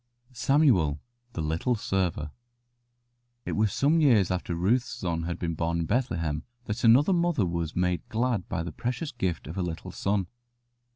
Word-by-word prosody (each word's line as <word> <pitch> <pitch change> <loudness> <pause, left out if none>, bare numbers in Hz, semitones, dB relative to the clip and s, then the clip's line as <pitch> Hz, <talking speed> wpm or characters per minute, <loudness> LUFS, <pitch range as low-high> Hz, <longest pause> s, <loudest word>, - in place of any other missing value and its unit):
SAMUEL, 120 - +3 0.3
THE 80 - -3
LITTLE 80 +11 0
SERVER 90 -8 -1 1.1
It - - -3
was 105 -1 +1
some 155 +4 +3
years 115 - +4
after 90 -1 -2
Ruth's 115 +10 +1
son 85 -2 -3
had 85 0 -3
been 85 -2 -2
born 85 +1 -1
in - - -1
Bethlehem 85 - -1 0.2
that 105 - -4
another 130 +10 +6
mother 170 - +2
was 85 -2 -3
made 90 -1 0
glad 115 -4 -1
by 90 -4 -2
the 85 - -5
precious 125 - -3
gift 95 -8 -2
of 80 +6 -5
a - - +1
little 85 -2 -4
son. 100 -1 0
95 Hz, 165 wpm, -27 LUFS, 85-120 Hz, 1.1 s, another